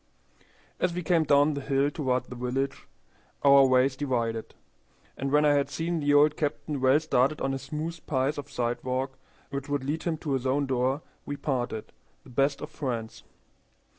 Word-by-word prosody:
As 175 -1 0
we 180 - -3
came 165 -1 +2
down 145 +1 +4
the 140 - -4
hill 140 +1 +1
toward 130 -4 0
the 125 - -10
village 130 +3 -3 0.6
our 140 -1 +7
ways 130 +1 +3
divided, 115 -5 -2 0.6
and 135 0 -3
when 150 +1 +4
I 145 - +5
had 140 -1 +1
seen 165 +1 -2
the 145 -1 +1
old 150 +1 +5
captain 145 -1 -2
well 130 +3 +5
started 150 -2 +1
on 135 - -1
a 135 - -2
smooth 160 +4 -5
piece 140 +1 0
of 145 - -8
sidewalk 130 +2 -2 0.3
which 140 +1 -4
would 145 -2 -1
lead 150 +4 -2
him 165 -2 -1
to 150 -1 -5
his 130 -1 -1
own 140 +2 +1
door, 130 +2 0 0.2
we 145 - -3
parted, 120 -7 -3 0.3
the - - -15
best 140 +3 +1
of 150 - -6
friends. 120 -7 -4
140 Hz, 180 wpm, -28 LUFS, 130-150 Hz, 0.6 s, our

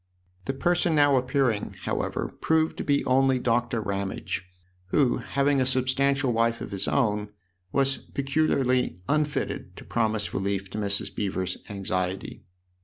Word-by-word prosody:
The 135 - -1
person 175 +2 +2
now 145 -2 +5
appearing, 125 -4 +1
however, - - -2
proved 160 0 +2
to - - -3
be 140 -1 +1
only 130 0 +4
Doctor 120 -1 +1
Ramage, 100 -3 -3 0.4
who, 125 +5 +2
having 140 0 +1
a - - +3
substantial 130 +1 +2
wife 115 0 +1
of - - -6
his 100 -1 -3
own, 105 -6 +1 0.4
was 135 +2 +2
peculiarly 135 - 0
unfitted 150 -1 -1
to - - -11
promise 110 -3 -1
relief 95 0 -2
to 105 - -4
Mrs. 100 -1 -1
Beever's 95 -2 -2
anxiety. 95 -2 -3
125 Hz, 135 wpm, -26 LUFS, 105-140 Hz, 0.4 s, now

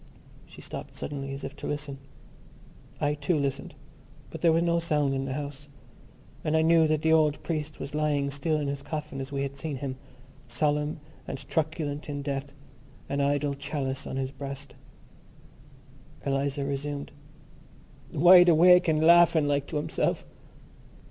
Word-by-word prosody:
She - - -13
stopped - - -8
suddenly 135 -2 -5
as 135 +1 -6
if 135 +2 -6
to - - -6
listen. 145 -2 -4 1.0
I 145 0 +1
too 150 +3 0
listened; 140 -1 -3 0.6
but - - -8
there 170 - +5
was 165 +1 +3
no 170 0 +2
sound 150 -4 +1
in 135 0 -2
the 135 - -3
house: 145 0 -6 0.7
and 155 +1 +1
I 160 - +3
knew 165 0 +5
that 155 0 0
the 160 0 +4
old 155 -2 +3
priest 155 -2 -3
was 140 - -6
lying 145 -2 0
still 150 +3 -1
in 145 - -2
his 140 0 -3
coffin 150 -2 -5
as 135 +1 -7
we 140 -1 -1
had 140 0 -5
seen 150 0 -4
him, 130 0 -5 0.5
solemn 150 +4 0 0.3
and - - -4
truculent 155 -2 -2
in 145 -1 -4
death, 140 0 -3 0.6
an 140 +1 0
idle 145 0 +1
chalice 140 -1 -4
on - - -5
his 135 0 -2
breast. 140 0 -7 1.5
Eliza 140 0 -1
resumed: 140 +1 -4 1.0
"Wide 175 +3 +7
awake 180 +2 +6
and 155 -1 +2
laughing 170 -2 +6
like 145 -1 0
to - - -6
himself.... 150 - -1
145 Hz, 160 wpm, -27 LUFS, 140-155 Hz, 1.5 s, Wide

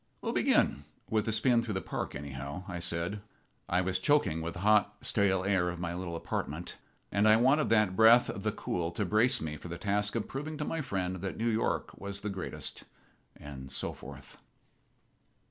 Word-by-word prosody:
"We'll - - -3
begin 70 - +2 0.3
with 110 -1 +2
the 110 - 0
spin 120 +2 +3
through 110 -3 -4
the - - +1
Park, - - -4
anyhow," 70 +4 -6
I 90 -2 -4
said. 85 +4 -1 0.5
I 90 +1 +3
was 95 0 0
choking 95 - +2
with 85 +1 -4
the 90 - -7
hot, 105 0 +4
stale 95 -2 +2
air 95 -3 +2
of 90 -1 -5
my 85 -1 -3
little 85 -1 -4
apartment, 80 0 -4 0.4
and 105 +1 +3
I 110 +1 +7
wanted 135 +6 +3
that 105 -4 +3
breath 115 +3 +7
of 100 - -5
the 110 +1 0
cool 85 -4 -2
to 105 +4 -1
brace 120 +7 +3
me 75 -1 -4
for 85 - -10
the 85 0 -5
task 105 +3 -1
of 115 - -1
proving 150 +3 -5
to 150 - -3
my 165 +1 -2
friend 95 -7 -2
that 95 +1 -5
New 115 +1 0
York 110 0 0
was 100 0 -5
the 105 - -3
greatest 95 -2 -5 0.5
and 65 -2 -9
so 65 - -1
forth. 70 0 -12
95 Hz, 195 wpm, -31 LUFS, 85-110 Hz, 0.5 s, I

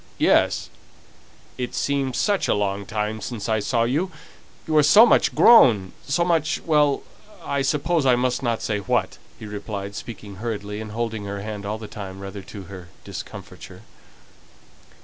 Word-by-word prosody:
"Yes; - - +2 0.9
it 125 - -3
seems 135 -3 -1
such 205 -2 +1
a - - +2
long 100 -1 -2
time 110 0 -3
since 115 0 -5
I 110 -1 +1
saw 115 +3 +1
you. 150 +11 0 0.6
You 155 - 0
are - - +8
so 205 +10 +8
much 235 - +3
grown 110 - +6
so 170 +5 +1
much 165 -2 +1
well, 150 -3 +2 0.4
I 140 -1 -1
suppose 150 +4 +1
I 130 -2 +4
mustn't 125 -2 -1
say 105 -2 -1
what," 100 - -1 0.2
he - - -9
replied, 100 -1 -6
speaking 105 -3 -8
hurriedly, 105 -1 -4
and 110 -1 -8
holding 110 -2 -3
her 100 0 -5
hand 105 -1 -6
all 105 +1 -2
the 110 -1 -8
time, 95 -2 -8
rather 100 +1 -7
to 100 +1 -10
her 90 -1 -11
discomfiture. - - -9
110 Hz, 160 wpm, -23 LUFS, 100-140 Hz, 0.9 s, are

